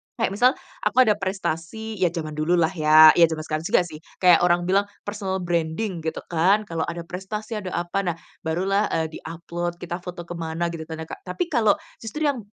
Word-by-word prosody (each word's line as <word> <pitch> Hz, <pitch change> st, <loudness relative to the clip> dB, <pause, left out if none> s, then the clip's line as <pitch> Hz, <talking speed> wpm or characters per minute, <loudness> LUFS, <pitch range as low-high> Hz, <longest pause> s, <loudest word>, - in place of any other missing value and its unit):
kayak 225 Hz, -5 st, 0 dB
misal 245 Hz, +6 st, +3 dB, 0.2 s
aku 255 Hz, -, +4 dB
ada 215 Hz, -, +3 dB
prestasi 195 Hz, +3 st, -3 dB
ya 180 Hz, -, +4 dB
zaman 165 Hz, -2 st, -4 dB
dulu 170 Hz, +3 st, +2 dB
lah 165 Hz, -1 st, +3 dB
ya. 155 Hz, -2 st, +8 dB
Ya 170 Hz, -, +9 dB
zaman 155 Hz, -1 st, -4 dB
sekarang 155 Hz, +1 st, -3 dB
juga -, -, +4 dB
sih, 160 Hz, -3 st, -9 dB, 0.2 s
kayak 180 Hz, -2 st, +7 dB
orang 175 Hz, 0 st, +3 dB
bilang 195 Hz, +3 st, +2 dB, 0.2 s
personal 195 Hz, -2 st, -3 dB
branding 170 Hz, +2 st, -1 dB
gitu 160 Hz, -, -3 dB
kan, 190 Hz, +6 st, +3 dB
kalau 165 Hz, -4 st, -3 dB
ada 170 Hz, 0 st, -4 dB
prestasi, 210 Hz, +5 st, -5 dB
ada 185 Hz, -2 st, -6 dB
apa, 175 Hz, +3 st, -1 dB
nah, 170 Hz, -2 st, -1 dB, 0.3 s
barulah, 195 Hz, +5 st, +1 dB
eee, 160 Hz, -1 st, 0 dB
di-upload, 170 Hz, +1 st, -5 dB
kita 175 Hz, 0 st, -4 dB
foto 180 Hz, -1 st, -7 dB
ke 175 Hz, +1 st, -8 dB
mana, 165 Hz, +1 st, -2 dB
gitu 160 Hz, -2 st, -6 dB
kan 160 Hz, 0 st, -6 dB
ya -, -, -5 dB
,Kak. -, -, -7 dB
Tapi 180 Hz, -, -1 dB
kalau 220 Hz, -6 st, +4 dB, 0.3 s
justru 235 Hz, +8 st, -5 dB
yang 240 Hz, -7 st, -3 dB
175 Hz, 205 wpm, -24 LUFS, 165-200 Hz, 0.3 s, Ya